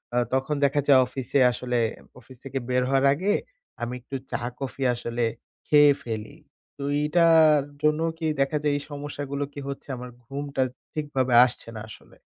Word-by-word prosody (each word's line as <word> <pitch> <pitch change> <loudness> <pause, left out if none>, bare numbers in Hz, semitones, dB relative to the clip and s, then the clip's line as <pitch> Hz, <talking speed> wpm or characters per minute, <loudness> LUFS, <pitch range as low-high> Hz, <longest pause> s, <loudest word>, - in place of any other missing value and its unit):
আ - - +2 0.2
তখন 135 +3 0
দেখা 140 +1 +3
যায় 135 -2 +7
অফিসে 130 +1 -1
আসলে 125 0 -2 0.4
অফিস 130 0 -15
থেকে 135 0 -3
বের 125 0 +2
হওয়ার 135 0 +3
আগে 190 +8 0 0.5
আমি 120 +1 -3
একটু 135 +2 -8 0.2
চা-কফি 125 +3 -4
আসলে 120 0 -3 0.4
খেয়ে 145 -1 +7
ফেলি। 115 +6 -6 0.4
তো 140 - -6 0.2
এইটার 155 -1 +5 0.2
জন্য 150 +1 +2 0.2
কি 165 - -4 0.2
দেখা 135 +3 +1
যায় 145 -1 +2
এই - - -5
সমস্যাগুলো 145 -1 -4
কি 145 - -7
হচ্ছে? 140 +1 -7
আমার 125 0 -8
ঘুমটা 140 +1 -4 0.3
ঠিকভাবে 135 -5 -1
আসছে 125 -2 -4
না 110 - -6
আসলে। - - -14
140 Hz, 160 wpm, -25 LUFS, 125-145 Hz, 0.5 s, যায়